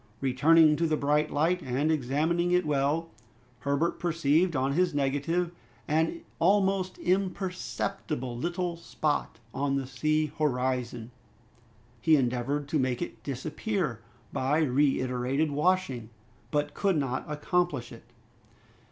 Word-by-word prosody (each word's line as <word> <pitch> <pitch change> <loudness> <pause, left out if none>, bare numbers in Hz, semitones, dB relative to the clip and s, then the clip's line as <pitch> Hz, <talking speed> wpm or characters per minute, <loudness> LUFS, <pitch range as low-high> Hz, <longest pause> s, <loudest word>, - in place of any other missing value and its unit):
Returning 150 +4 +5
to 165 - +1
the 155 -1 +1
bright 150 +2 +1
light, 170 +5 +1
and 135 +4 0
examining 155 +5 +1
it 180 -1 +3
well, 150 +3 0 0.5
Herbert 140 +6 0
perceived 165 0 +2
on 135 +1 +1
his 175 0 +1
negative 145 +5 0 0.4
an 160 +2 +1 0.2
almost 190 0 +2
imperceptible 180 -7 -2
little 175 +5 -2
spot 155 -6 -2 0.2
on 140 0 0
the 135 -1 -1
sea 155 +3 0
horizon. 125 -4 -1 0.9
He 160 +4 +5
endeavored 135 +2 0
to 155 - +1
make 130 -2 0
it 110 - -6
disappear 150 - -3 0.3
by 145 +5 +1
reiterated 135 +1 +1
washing, 145 -7 0 0.4
but 145 -1 -1
could 195 -4 +1
not 130 -3 -1
accomplish 150 -3 -1
it. - - -12
150 Hz, 115 wpm, -28 LUFS, 135-170 Hz, 0.9 s, Returning